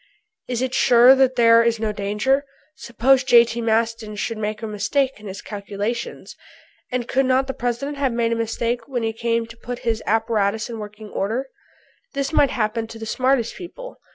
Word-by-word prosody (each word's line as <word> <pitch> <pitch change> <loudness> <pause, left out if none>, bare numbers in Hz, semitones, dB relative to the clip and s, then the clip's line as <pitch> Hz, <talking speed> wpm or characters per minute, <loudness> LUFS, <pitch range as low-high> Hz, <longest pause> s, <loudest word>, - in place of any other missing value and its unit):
"Is 245 0 -2
it 260 -1 -2
sure 250 -1 +6
that 265 -1 +3
there 230 -1 +6
is 230 -1 +1
no 220 -1 -1
danger? 210 +7 0 0.3
Suppose 255 0 +2
J.T. 235 -2 +4
Maston 225 -1 0
should 220 +2 -3
make 215 +1 -3
a - - -2
mistake 255 +5 -1
in 210 - -10
his 195 +1 -7
calculations? 205 +3 -5 0.6
And 250 -1 -2
could 265 +1 +1
not 260 +1 +3
the 265 - -4
President 245 +5 -3
have 270 -2 +1
made 235 0 0
a - - +1
mistake 230 +1 -2
when 250 -4 -3
he 225 0 -1
came 230 0 -1
to 230 0 -13
put 245 +1 -6
his 225 -1 0
apparatus 220 0 0
in 225 - -6
working 210 0 -9
order? 230 +9 -2 0.7
This 275 +2 -2
might 285 -3 +4
happen 225 0 -1
to 225 - -10
the 225 - -7
smartest 255 0 +1
people. 450 +8 -9
230 Hz, 185 wpm, -22 LUFS, 220-255 Hz, 0.7 s, sure